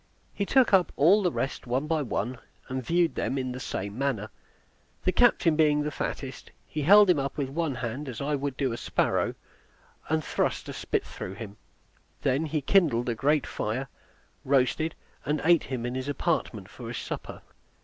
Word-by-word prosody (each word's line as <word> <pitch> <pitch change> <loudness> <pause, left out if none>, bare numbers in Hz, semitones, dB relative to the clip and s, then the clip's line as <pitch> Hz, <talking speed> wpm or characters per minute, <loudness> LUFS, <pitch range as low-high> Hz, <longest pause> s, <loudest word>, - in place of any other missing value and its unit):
He 200 - -2
took 260 -5 +4
up 185 -3 +5
all 185 +9 +5
the 180 -3 +1
rest 135 - -3
one 130 +4 0
by 160 0 0
one, 120 -1 -2 0.3
and 130 0 -3
viewed 170 +4 +2
them 135 - -2
in 130 -1 -2
the 125 - -6
same 100 -5 -4
manner. 125 -7 -1 0.7
The 185 - +3
captain 185 -8 +4
being 150 -1 +3
the 150 - -2
fattest, 135 -2 -5 0.2
he 155 - -4
held 200 +5 +7
him 175 - +2 0.2
with 140 -3 -2
one 155 -1 -1
hand, 130 +3 -4
as 120 - -6
I 145 +2 -1
would 140 -1 -2
do 135 -3 0
a - - -4
sparrow, - - 0 0.7
and 160 0 +1
thrust - - -1
a - - -5
spit - - -2
through 95 - -7
him; 105 -2 -8 0.7
he - - 0
then 140 +5 +1 0.2
kindled 140 -10 +3
a - - +1
great 145 +5 +2
fire, 125 +5 -3 0.5
roasted, 140 +4 +1 0.3
and 150 +1 0
ate 170 0 +4
him 125 -3 -4
in 120 - -3
his 130 +1 -4
apartment 145 - -1
for - - -10
his - - -4
supper. - - -6
140 Hz, 185 wpm, -27 LUFS, 130-160 Hz, 0.7 s, held